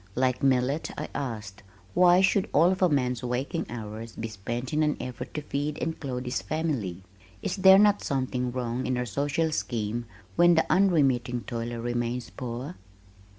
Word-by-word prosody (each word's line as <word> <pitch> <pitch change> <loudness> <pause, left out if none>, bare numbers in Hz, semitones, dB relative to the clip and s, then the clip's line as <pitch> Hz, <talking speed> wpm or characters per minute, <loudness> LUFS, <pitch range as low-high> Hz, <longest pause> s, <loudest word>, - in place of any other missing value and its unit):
Like 130 +1 +1
Millet, 135 +2 +1
I 150 - -4
asked, 110 -7 -5 0.3
"Why 180 0 +6
should 190 0 +2
all 170 +4 +5
of 190 - -2
a 180 - +5
man's 125 -5 0
waking 125 +6 -2
hours 110 -1 -7
be 115 - -4
spent 120 +5 -5
in 155 - +2
an 150 -1 +1
effort 125 -2 -6
to 150 - -3
feed 145 +1 -2
and 160 0 -3
clothe 130 -3 -4
his 125 -5 -2
family? 105 - -2 0.4
Is - - -2
there 190 0 +8
not 205 0 +5
something 130 -2 -1
wrong 125 0 -2
in 130 - 0
our 125 - -1
social 145 +7 0
scheme 115 -4 -2 0.3
when 175 0 +6
the 160 - +3
unremitting 135 -11 +3
toiler 115 0 -4
remains 120 +1 -2
poor?" 120 -5 -6
125 Hz, 170 wpm, -27 LUFS, 120-155 Hz, 0.4 s, there